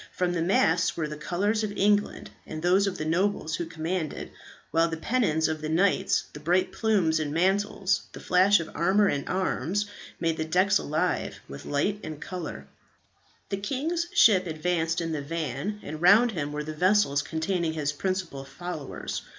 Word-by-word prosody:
From 180 -1 0
the 170 - -1
masts 175 -1 +2
were 160 -2 -1
the 150 - -6
colours 200 +8 -1
of 205 -1 -4
England 205 +1 +1 0.2
and 155 - -6
those 185 +4 +3
of 190 -2 -3
the 155 - -3
nobles 170 0 0
who 170 - -4
commanded; 165 0 -4 0.4
while 165 +1 +3
the 165 - -4
pennons 160 -6 +1
of 155 -1 -3
the 155 - -3
knights, 185 +5 +2
the - - -8
bright 175 +5 +1
plumes 190 -8 +1
and 150 -2 -2
mantles, 190 +3 +1
the - - -10
flash 190 +3 +4
of 165 - -6
armour 190 +5 +3
and 140 -1 -2
arms, 185 +1 -1 0.3
made 165 -1 0
the 160 - -1
decks 185 +5 +3
alive 155 +2 -1
with 70 - -9
light 195 +9 0
and 155 -2 -6
colour. 160 - -6 0.8
The 195 - -1
king's 300 - -2
ship 200 - +5
advanced 165 +1 -1
in 165 -1 -3
the 155 -2 -2
van, 165 +6 -3
and 155 +1 -7
round 210 +7 +6
him 150 -7 -3
were 150 0 -3
the 155 +1 -5
vessels 180 -4 +3
containing 165 +1 -2
his 150 -2 -1
principal 180 -3 -3
followers. 155 0 -6
170 Hz, 175 wpm, -27 LUFS, 155-195 Hz, 0.8 s, round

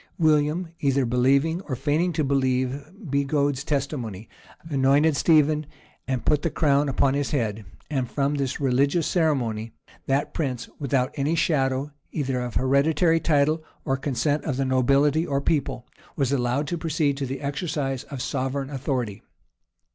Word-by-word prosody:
[*] - - -40
William, 155 +2 +2
either 140 -2 +2
believing 135 +8 +2
or 130 - -1
feigning 155 +7 +1
to 155 -2 0
believe 130 -1 0 0.3
Bigod's 140 0 0
testimony, 135 -8 -3 0.4
anointed 140 +1 +3
Stephen, 155 -1 +3 0.4
and 130 -4 -2
put 150 -1 +3
the 165 - 0
crown 145 -2 +2
upon 135 0 +2
his 140 0 -1
head; 110 -6 -2 0.2
and 130 -5 -2
from 140 +3 0
this 140 -2 -2
religious 140 +4 +2
ceremony, 120 -10 0 0.3
that 135 +2 0
prince, 130 -7 -2
without 135 -3 0
any 145 +4 +1
shadow, 140 -3 +1 0.2
either 135 -4 -1
of 120 -2 -5
hereditary 155 +5 +3
title 155 0 +2 0.2
or 135 - +1
consent 145 +2 -1
of 135 -5 -2
the 135 - 0
nobility 140 +4 +3
or 140 -5 -1
people, 135 -4 -1 0.3
was 135 -3 0
allowed 130 +1 0
to 170 +3 -3
proceed 155 -3 0
to 135 -1 -2
the 135 +2 -4
exercise 140 -2 -2
of 135 -4 -6
sovereign 135 +1 -2
authority. 130 -6 -3
140 Hz, 150 wpm, -25 LUFS, 130-150 Hz, 0.4 s, anointed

